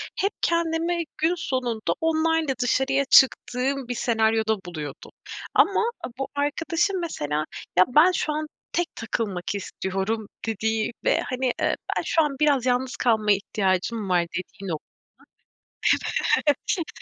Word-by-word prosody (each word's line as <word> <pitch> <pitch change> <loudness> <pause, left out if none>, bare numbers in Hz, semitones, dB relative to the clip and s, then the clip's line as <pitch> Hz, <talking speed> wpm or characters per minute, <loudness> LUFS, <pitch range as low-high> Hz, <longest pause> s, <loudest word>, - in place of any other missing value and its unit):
hep 400 +2 0
kendimi 335 0 +1
gün 330 +3 +2
sonunda, 245 - -1
onlarla 320 -2 +2
dışarıya 270 +3 +2
çıktığım 265 0 +3
bir 245 - -3
senaryoda 220 -2 +1
buluyordum. 155 -5 -7 0.4
Ama 390 - +4 0.4
bu 270 - -1
arkadaşım 330 +6 0
mesela, 150 - -2 0.3
ya, 185 - +8
ben 305 +8 +6
şu 305 -3 -1
an 310 +1 -3 0.2
tek 350 -1 -1
takılmak 200 -4 -3
istiyorum 200 +2 -3 0.2
dediği 220 +1 0
ve - - +3
hani, 255 +1 -3 0.2
eee, - - +2 0.2
ben - - +1
şu 325 - +3
an 295 -3 0
biraz 285 -5 +3
yalnız 255 +1 0
kalmaya 215 -4 +3
ihtiyacım 195 +1 -1
var, 180 -1 +4
dediği 185 +3 -7
nokta. 160 -4 -6 1.5
Evet. 320 +4 +1
250 Hz, 125 wpm, -25 LUFS, 210-315 Hz, 1.5 s, ya